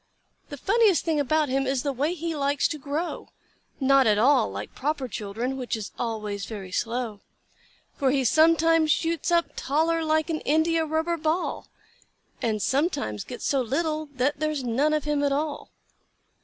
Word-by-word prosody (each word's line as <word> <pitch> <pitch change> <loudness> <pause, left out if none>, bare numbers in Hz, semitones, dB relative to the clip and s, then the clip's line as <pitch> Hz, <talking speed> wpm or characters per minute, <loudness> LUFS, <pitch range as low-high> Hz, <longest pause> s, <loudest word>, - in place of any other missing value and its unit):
The 285 - -7
funniest 405 - +3
thing 320 -3 +1
about 305 +2 +2
him 270 0 0
is 265 -1 0
the 285 -2 -1
way 295 +7 -1
he 330 -1 -3
likes 280 -1 +1
to 305 - -4
grow— 295 +5 -4 0.5
Not 270 -2 +4
at 210 -1 +4
all 260 - +4
like 100 +2 -7
proper 285 -1 -2
children, 230 +4 -4
which 250 -3 -3
is 215 - -6
always 210 -4 -3
very 195 -4 -7
slow; 230 0 -2 0.8
For 270 - +2
he 270 0 +2
sometimes 325 +3 +4
shoots 330 +1 0
up 340 -1 +2
taller 325 +4 0
like 315 +1 +1
an 310 - -1
india 320 +2 +2
rubber 320 +2 0
ball, 320 +3 -2 0.7
And 225 - +1
he - - -4
sometimes 265 - 0
gets 245 - -7
so 275 -2 +2
little 310 +5 -1
that 285 +1 -1
there's 305 -3 -1
none 275 +6 +1
of 305 - -1
him 295 -1 0
at 285 - +2
all. 290 +1 -2
285 Hz, 170 wpm, -26 LUFS, 255-315 Hz, 0.8 s, Not